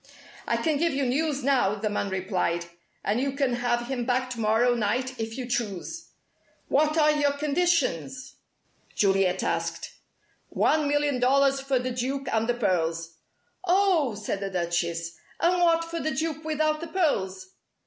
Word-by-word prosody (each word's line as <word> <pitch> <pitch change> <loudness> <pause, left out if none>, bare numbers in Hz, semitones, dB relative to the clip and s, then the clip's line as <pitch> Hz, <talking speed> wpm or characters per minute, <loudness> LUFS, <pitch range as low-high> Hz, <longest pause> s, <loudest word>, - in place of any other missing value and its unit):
"I - - +1
can 315 -2 0
give 335 -3 +1
you 275 -1 0
news 285 +2 0
now," 255 -7 +2
the 210 +1 -3
man 205 -1 -1
replied. 185 -3 -1 0.4
"And 215 +5 0
you 275 0 -1
can 275 -3 0
have 240 0 0
him 250 -1 -3
back 255 +1 0
to 240 - -5
morrow 225 +3 +3
night 240 +3 -1
if 225 +1 -4
you 255 - -3
choose." 240 - -3 0.6
"What 305 +3 +2
are 305 -1 +5
your 290 -1 +2
conditions?" 285 - 0 0.6
Juliet 195 -2 +2
asked. - - -2 0.6
"One 305 -2 +2
million 290 -2 +1
dollars 275 +2 +3
for 270 -1 0
the 250 +1 -2
Duke 260 +3 -3
and 225 +1 +1
the 245 - +2
pearls." 165 -6 -1 0.5
"Oh!" 355 - +3
said 205 -1 -3
the 195 0 -3
Duchess. 170 -2 -2 0.2
"And 355 +1 +2
what 335 -1 +3
for 335 0 -4
the 315 - -1
Duke 315 +2 -2
without 310 0 0
the 335 - -5
pearls?" 195 - -1
255 Hz, 160 wpm, -26 LUFS, 205-300 Hz, 0.6 s, are